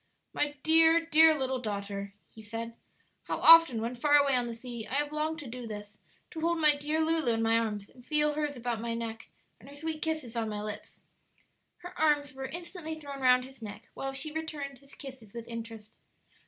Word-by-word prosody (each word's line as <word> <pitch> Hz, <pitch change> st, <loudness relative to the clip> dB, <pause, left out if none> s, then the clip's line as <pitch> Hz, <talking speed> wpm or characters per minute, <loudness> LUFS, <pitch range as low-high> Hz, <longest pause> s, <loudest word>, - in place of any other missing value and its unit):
"My 295 Hz, 0 st, -1 dB
dear, 325 Hz, +1 st, +5 dB
dear 320 Hz, -1 st, +6 dB
little 265 Hz, -1 st, -1 dB
daughter," 200 Hz, -3 st, -5 dB, 0.2 s
he 220 Hz, -, -12 dB
said. 230 Hz, +2 st, -6 dB, 0.5 s
"How -, -, -2 dB
often, 330 Hz, -7 st, +8 dB
when 235 Hz, +2 st, -2 dB
far 290 Hz, +4 st, +3 dB
away 285 Hz, -1 st, +5 dB
on 245 Hz, -1 st, +2 dB
the 235 Hz, -, -4 dB
sea, 235 Hz, -2 st, -7 dB
I 255 Hz, -, -4 dB
have 290 Hz, +1 st, 0 dB
longed 310 Hz, +1 st, -2 dB
to 280 Hz, -, -8 dB
do 240 Hz, 0 st, -7 dB
this 210 Hz, -1 st, -8 dB, 0.3 s
to 320 Hz, -, -6 dB
hold 340 Hz, +1 st, +1 dB
my 305 Hz, -2 st, +5 dB
dear 300 Hz, +2 st, -1 dB
Lulu 320 Hz, -6 st, +1 dB
in 225 Hz, 0 st, 0 dB
my 225 Hz, 0 st, +3 dB
arms 210 Hz, -3 st, -3 dB
and 250 Hz, -, -18 dB
feel 300 Hz, +2 st, +2 dB
hers 295 Hz, -1 st, -2 dB
about 235 Hz, -2 st, -3 dB
my 230 Hz, 0 st, -2 dB
neck 225 Hz, -1 st, -6 dB, 0.3 s
and 265 Hz, -, -14 dB
her 285 Hz, -, -11 dB
sweet 315 Hz, +1 st, -4 dB
kisses 310 Hz, -7 st, -2 dB
on 225 Hz, -2 st, -1 dB
my 210 Hz, -1 st, -4 dB
lips." 210 Hz, 0 st, -8 dB, 0.8 s
Her 355 Hz, +1 st, -8 dB
arms 295 Hz, -3 st, +2 dB
were 265 Hz, 0 st, -5 dB
instantly 340 Hz, -1 st, -6 dB
thrown 280 Hz, -2 st, -8 dB
round 250 Hz, -1 st, +5 dB
his 265 Hz, -1 st, -15 dB
neck, 210 Hz, +1 st, -9 dB
while 270 Hz, -, -4 dB
she 270 Hz, +3 st, -3 dB
returned 295 Hz, -4 st, -5 dB
his 275 Hz, 0 st, -14 dB
kisses 260 Hz, -6 st, -11 dB
with 235 Hz, -1 st, -7 dB
interest. 225 Hz, -2 st, -8 dB
265 Hz, 210 wpm, -30 LUFS, 230-305 Hz, 0.8 s, often